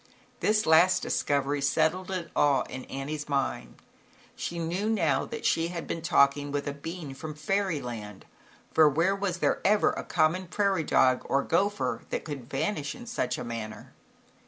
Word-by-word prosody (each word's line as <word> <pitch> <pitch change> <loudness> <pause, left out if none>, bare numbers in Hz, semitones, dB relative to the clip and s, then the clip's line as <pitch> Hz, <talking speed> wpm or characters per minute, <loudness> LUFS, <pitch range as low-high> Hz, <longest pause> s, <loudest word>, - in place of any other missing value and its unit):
This 215 0 +2
last 175 +3 +5
discovery 140 0 0
settled 160 +6 +1
it 180 -4 -4
all 140 -3 +3
in 130 - -8
Annie's 150 +2 -5
mind, 140 -2 -2 0.6
she 170 - -4
knew 175 +6 -1
now 165 -11 +1
that - - -7
she 165 0 +2
had 170 -1 -5
been 165 - -4
talking 145 -2 +3
with 145 0 -2
a 145 - -2
being 155 0 -7
from 155 +2 -7
Fairyland, 145 - -3 0.5
for 155 -1 +6
where 165 +7 +2
was 195 -2 -2
there - - +1
ever 210 +2 +4
a - - -5
common 175 +4 +1
prairie 195 -2 +1
dog 130 -3 +3
or 140 0 +1
gopher 200 +5 0
that - - -3
could 140 -6 -7
vanish 150 - -2
in 245 -1 -10
such 235 - -2
a - - -5
manner? 110 -2 -7
155 Hz, 165 wpm, -28 LUFS, 140-185 Hz, 0.6 s, for